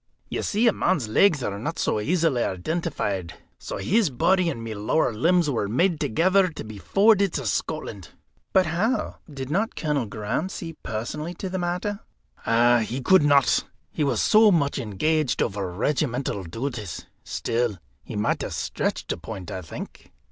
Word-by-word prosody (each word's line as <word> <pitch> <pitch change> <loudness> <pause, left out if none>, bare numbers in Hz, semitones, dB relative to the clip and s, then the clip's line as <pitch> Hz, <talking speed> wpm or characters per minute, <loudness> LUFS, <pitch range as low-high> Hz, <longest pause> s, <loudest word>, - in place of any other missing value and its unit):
You - - -2
see, 225 +3 +1
a 225 - +5
man's 160 -11 +1
legs 145 - +3
are 100 -2 -3
not 150 +9 -4
so - - 0
easily 155 0 +1
identified. 95 - -2 0.2
So - - -5
his 210 -3 +2
body 180 +7 +2
and 115 -8 -5
my 115 -1 -4
lower 110 +6 +1
limbs 170 +8 +3
were 115 -8 0
made 150 - +3
ready 165 - -6
together 185 - +3
to 165 - -7
be 110 -2 -9
forwarded 200 - +3
to 140 - -3
Scotland." 105 - -3 0.4
"But 190 -1 +4
how 195 +10 -1
did 135 -1 -6
not 210 +7 0
Colonel 145 -7 -1
Graham 105 - -2
see 165 -3 -6
personally 150 +10 -4
to 190 - -5
the 185 0 -3
matter?" 180 +4 -2 0.8
"He 120 +5 -4
could 190 +7 +5
not. 145 -2 +4 0.3
He - - -1
was 140 - +1
so 215 0 +6
much 145 -6 +1
engaged 135 +6 0
over 95 -2 -1
regimental 125 - -1
duties. 115 - -5 0.2
Still, 115 -3 -1 0.3
he - - -8
might 105 +1 0
have - - -4
stretched - - -2
a - - -2
point, 95 -6 -7
I 95 - -4
think." 80 - -9
145 Hz, 170 wpm, -25 LUFS, 110-180 Hz, 0.8 s, so